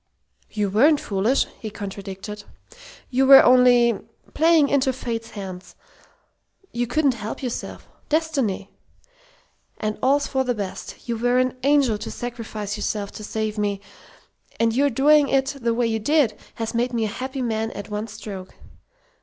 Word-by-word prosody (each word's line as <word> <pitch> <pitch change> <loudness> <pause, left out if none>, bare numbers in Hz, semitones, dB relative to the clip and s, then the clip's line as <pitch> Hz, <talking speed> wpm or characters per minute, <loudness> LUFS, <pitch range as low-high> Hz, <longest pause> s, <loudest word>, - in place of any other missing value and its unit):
"You 205 -2 -2
weren't 285 +9 +4
foolish!" 210 +5 +1
he 220 - -5
contradicted. 200 0 -7 0.7
"You 265 +1 +2
were 270 0 +10
only 245 -2 +5 0.3
playing 320 -2 +4
into 270 -1 +2
Fate's 230 -3 -5
hands. 190 -3 -8 1.0
You 240 0 -2
couldn't 280 +2 +2
help 220 +2 -6
yourself. 245 -2 -5 0.2
Destiny! 280 -12 -1 1.1
And 215 0 -3
all's 280 +2 +3
for 265 -1 0
the 250 -1 -1
best. 200 +2 -7
You 235 -1 -1
were 245 +1 +2
an 255 0 +1
angel 275 -6 +3
to - - -6
sacrifice 220 -4 -5
yourself 205 -1 -3
to 215 - -9
save 215 0 -3
me, 205 -1 -1 0.8
and 230 0 +2
your 285 +2 +3
doing 285 +3 +4
it 270 0 +2
the 235 0 +1
way 240 0 +1
you 225 -1 0
did 270 -2 +2 0.2
has 225 -1 -4
made 240 +2 0
me 230 -2 0
a 210 - -5
happy 265 0 -3
man 225 -1 -1
at 205 +1 -8
one 210 +1 -3
stroke. 205 -4 -9
235 Hz, 155 wpm, -23 LUFS, 210-265 Hz, 1.1 s, were